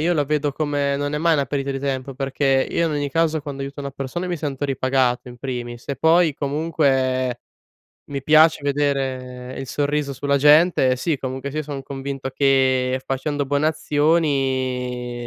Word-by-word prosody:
io 170 Hz, +3 st, +2 dB
lo 150 Hz, -3 st, +1 dB
vedo 150 Hz, 0 st, 0 dB
come 145 Hz, -1 st, -1 dB
non 145 Hz, +1 st, -2 dB
è 150 Hz, -, 0 dB
mai 165 Hz, +1 st, +3 dB
una 140 Hz, -3 st, +1 dB
perdita 140 Hz, +1 st, -2 dB
di 135 Hz, -, -3 dB
tempo. 135 Hz, -1 st, -3 dB
Perché 135 Hz, 0 st, +1 dB
io 170 Hz, -, +1 dB
in 155 Hz, -, -1 dB
ogni 145 Hz, -1 st, -2 dB
caso 160 Hz, +1 st, +1 dB
quando 140 Hz, -2 st, -6 dB
aiuto 140 Hz, +1 st, -6 dB
una 140 Hz, -, -4 dB
persona 140 Hz, +6 st, -4 dB
mi 175 Hz, -, -1 dB
sento 145 Hz, -2 st, -3 dB
ripagato 130 Hz, -2 st, 0 dB
in 120 Hz, 0 st, -11 dB
primis, 120 Hz, -2 st, -6 dB
e 140 Hz, -, -2 dB
poi 160 Hz, +1 st, +4 dB
comunque 135 Hz, -4 st, 0 dB, 0.6 s
mi 140 Hz, -2 st, -5 dB
piace 155 Hz, +1 st, +5 dB
vedere 130 Hz, -3 st, -2 dB
il 135 Hz, -, -5 dB
sorriso 145 Hz, +1 st, -1 dB
sulla 140 Hz, +2 st, 0 dB
gente. 150 Hz, -3 st, +5 dB
Sì, 150 Hz, +1 st, -1 dB
comunque 130 Hz, +2 st, -4 dB
sia 155 Hz, +2 st, -3 dB
son 140 Hz, -2 st, -6 dB
convinto 135 Hz, 0 st, -5 dB
che 130 Hz, -2 st, +2 dB
facendo 145 Hz, +2 st, -2 dB
buone 145 Hz, +2 st, +1 dB
azioni 130 Hz, -6 st, 0 dB
140 Hz, 175 wpm, -22 LUFS, 130-150 Hz, 0.6 s, piace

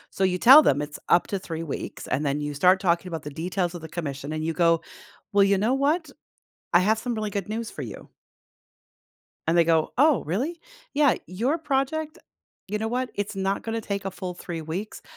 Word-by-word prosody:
So 190 Hz, -, +1 dB
you 180 Hz, -1 st, +1 dB
tell 265 Hz, +9 st, +9 dB
them 145 Hz, -, +2 dB
it's 145 Hz, 0 st, -7 dB
up 175 Hz, -, +4 dB
to 200 Hz, -, -1 dB
3 165 Hz, -3 st, -5 dB
weeks, 155 Hz, -5 st, -6 dB
and 145 Hz, +3 st, 0 dB
then 140 Hz, +1 st, 0 dB
you 145 Hz, 0 st, -3 dB
start 180 Hz, +6 st, +4 dB
talking 175 Hz, -1 st, +1 dB
about 165 Hz, -3 st, -5 dB
the 150 Hz, -, -6 dB
details 175 Hz, +3 st, -2 dB
of 175 Hz, -, -6 dB
the 160 Hz, -, -8 dB
commission, 140 Hz, -3 st, -5 dB
and 155 Hz, 0 st, -3 dB
you 165 Hz, -, 0 dB
go, 165 Hz, -1 st, +3 dB, 0.5 s
"Well, 200 Hz, 0 st, +5 dB
you 200 Hz, 0 st, +3 dB
know 215 Hz, +7 st, +1 dB
what? 295 Hz, +3 st, +1 dB, 0.6 s
I 175 Hz, -, +7 dB
have 215 Hz, +4 st, +2 dB
some 240 Hz, 0 st, -3 dB
really 215 Hz, -1 st, -2 dB
good 200 Hz, -1 st, -4 dB
news 225 Hz, +1 st, -3 dB
for -, -, -8 dB
you." -, -, -8 dB, 1.4 s
And 165 Hz, -, +3 dB
they 170 Hz, -, +6 dB
go, 160 Hz, -1 st, +2 dB
"Oh, 295 Hz, -1 st, +5 dB
really?" 265 Hz, -, -2 dB, 0.3 s
"Yeah, 285 Hz, -3 st, +4 dB
your 240 Hz, -, -1 dB
project 305 Hz, +1 st, -1 dB, 0.5 s
you 210 Hz, +2 st, -2 dB
know 220 Hz, -, -2 dB
what? 250 Hz, +2 st, -2 dB
It's 205 Hz, +1 st, -3 dB
not 195 Hz, 0 st, -1 dB
gonna 225 Hz, 0 st, -3 dB
take 200 Hz, -2 st, -4 dB
a 195 Hz, -, -2 dB
full 185 Hz, -1 st, -5 dB
3 175 Hz, -2 st, -6 dB
weeks, 180 Hz, +7 st, -5 dB
190 Hz, 215 wpm, -25 LUFS, 165-230 Hz, 1.4 s, tell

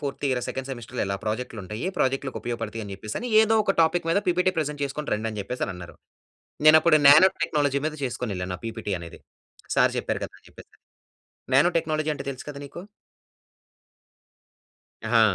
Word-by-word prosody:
Fourth 140 Hz, -1 st, -4 dB
year 130 Hz, -2 st, 0 dB
second 130 Hz, 0 st, -5 dB
సెమెస్టర్‌లో 120 Hz, -1 st, -5 dB
ఎలా 100 Hz, 0 st, -2 dB
ప్రాజెక్ట్‌లుంటాయి. 110 Hz, -, -4 dB
ప్రాజెక్ట్‌లకు 135 Hz, 0 st, 0 dB
ఉపయోగపడుతాయి 115 Hz, -1 st, -4 dB
అని 100 Hz, -, -8 dB
చెప్పేసని 110 Hz, -, -5 dB
ఎదో 220 Hz, 0 st, +3 dB
ఒక 195 Hz, -, +1 dB
టాపిక్ 165 Hz, +1 st, +1 dB
మీద 185 Hz, -, +3 dB
పీపీటీ 180 Hz, +1 st, +2 dB
ప్రెజెంట్ 150 Hz, -1 st, -2 dB
చేసుకొని 145 Hz, +2 st, -5 dB
రండి 110 Hz, +2 st, -2 dB
అని 105 Hz, -, -5 dB
చెప్పేసని 115 Hz, 0 st, -3 dB
అన్నారు. 90 Hz, -1 st, -10 dB, 0.7 s
నేను 155 Hz, +1 st, +10 dB
అప్పుడు 155 Hz, -1 st, +5 dB
నానో 155 Hz, +7 st, +9 dB
టెక్నాలజీ 145 Hz, -2 st, +1 dB
మీద 155 Hz, -, -3 dB
చేసుకొనెళ్ళాను. 100 Hz, -8 st, -3 dB
ఆ -, -, -27 dB
పీపీటీ 115 Hz, -3 st, -4 dB
అనేది. 85 Hz, -1 st, -10 dB, 0.6 s
సార్ -, -, +4 dB
చెప్పారు -, -, -2 dB
కదా! -, -, -8 dB
అని -, -, -24 dB
చెప్పేసి. -, -, -16 dB, 0.8 s
నానో 145 Hz, +6 st, +6 dB
టెక్నాలజీ 155 Hz, -1 st, -1 dB
అంటే 140 Hz, -, -6 dB
తెలుసు 130 Hz, -, -10 dB
కదా 140 Hz, -1 st, -7 dB
నీకు? 160 Hz, +5 st, -9 dB, 2.3 s
ఆ! -, -, +5 dB
135 Hz, 165 wpm, -25 LUFS, 110-155 Hz, 2.3 s, నేను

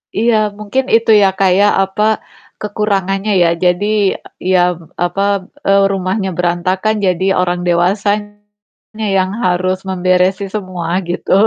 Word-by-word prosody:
Iya, 230 Hz, +1 st, +2 dB, 0.2 s
mungkin 235 Hz, +6 st, -1 dB
itu 230 Hz, -1 st, +3 dB
ya, 195 Hz, -, +5 dB
Kak, 190 Hz, -2 st, +3 dB
ya, 205 Hz, -, +5 dB, 0.2 s
apa, 195 Hz, +2 st, -2 dB, 0.6 s
kekurangannya 205 Hz, -1 st, -1 dB
ya, -, -, +3 dB, 0.2 s
jadi, 180 Hz, +3 st, +2 dB, 0.3 s
e -, -, -13 dB, 0.2 s
ya, 185 Hz, -, +4 dB, 0.5 s
apa, 175 Hz, +3 st, -2 dB, 0.5 s
eee, 195 Hz, 0 st, +4 dB
rumahnya 190 Hz, +1 st, -2 dB
berantakan 185 Hz, +4 st, 0 dB
jadi 185 Hz, 0 st, 0 dB, 0.2 s
orang 180 Hz, -1 st, 0 dB
dewasanya 205 Hz, +4 st, 0 dB, 0.8 s
yang 185 Hz, 0 st, 0 dB
harus 185 Hz, +1 st, +1 dB
memberesi 185 Hz, +1 st, +1 dB
semua 185 Hz, -5 st, -5 dB, 0.2 s
gitu. 175 Hz, -, -4 dB
190 Hz, 125 wpm, -15 LUFS, 180-205 Hz, 0.8 s, ya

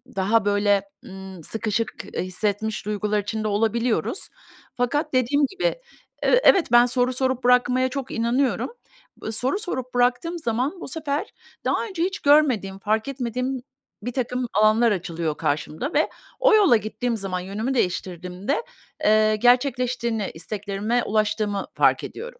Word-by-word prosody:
daha 200 Hz, +3 st, +2 dB
böyle, 205 Hz, -1 st, +2 dB, 0.2 s
ımm, 190 Hz, -2 st, -10 dB
sıkışık, 225 Hz, +3 st, -2 dB, 0.2 s
eee, -, -, -1 dB
hissetmiş 205 Hz, +3 st, -2 dB
duygular 210 Hz, 0 st, 0 dB
içinde 215 Hz, +1 st, -3 dB
olabiliyoruz. 225 Hz, -, 0 dB, 0.5 s
Fakat 290 Hz, +5 st, -1 dB
dediğim 260 Hz, +3 st, +3 dB
gibi, 385 Hz, +3 st, -8 dB, 0.6 s
e -, -, +3 dB
evet, 380 Hz, -4 st, +6 dB
ben 240 Hz, 0 st, +7 dB
soru 250 Hz, +1 st, +1 dB
sorup 260 Hz, 0 st, -1 dB
bırakmaya 250 Hz, +1 st, +3 dB
çok 265 Hz, -1 st, -5 dB
inanıyorum. 240 Hz, +4 st, 0 dB, 0.5 s
B 220 Hz, -, -3 dB
soru 255 Hz, -, -1 dB
sorup 260 Hz, -, -5 dB
bıraktığım 250 Hz, +8 st, +1 dB
zaman 270 Hz, +6 st, -2 dB
bu -, -, -6 dB
sefer 300 Hz, +5 st, -3 dB, 0.3 s
daha -, -, +1 dB
önce 375 Hz, -6 st, -3 dB
hiç 380 Hz, +1 st, -2 dB
görmediğim 255 Hz, -10 st, +3 dB
fark 215 Hz, +3 st, 0 dB
etmediğim 255 Hz, -1 st, -3 dB, 0.4 s
birtakım 250 Hz, +1 st, -2 dB
alanlar 215 Hz, +3 st, +4 dB
açılıyor 165 Hz, -5 st, -2 dB
karşımda 150 Hz, -, -2 dB
ve -, -, +2 dB, 0.3 s
o -, -, +5 dB
yola 385 Hz, -, +6 dB
gittiğim 225 Hz, +2 st, -3 dB
zaman 190 Hz, -3 st, -3 dB
yönümü 205 Hz, +8 st, -3 dB
değiştirdiğimde, 185 Hz, -, -2 dB, 0.4 s
eee, 215 Hz, 0 st, +4 dB
gerçekleştiğini, 245 Hz, -2 st, +1 dB
isteklerime 205 Hz, +6 st, -2 dB
ulaştığımı 210 Hz, -1 st, 0 dB
fark -, -, +3 dB
ediyorum. -, -, -8 dB
235 Hz, 135 wpm, -23 LUFS, 205-260 Hz, 0.6 s, ben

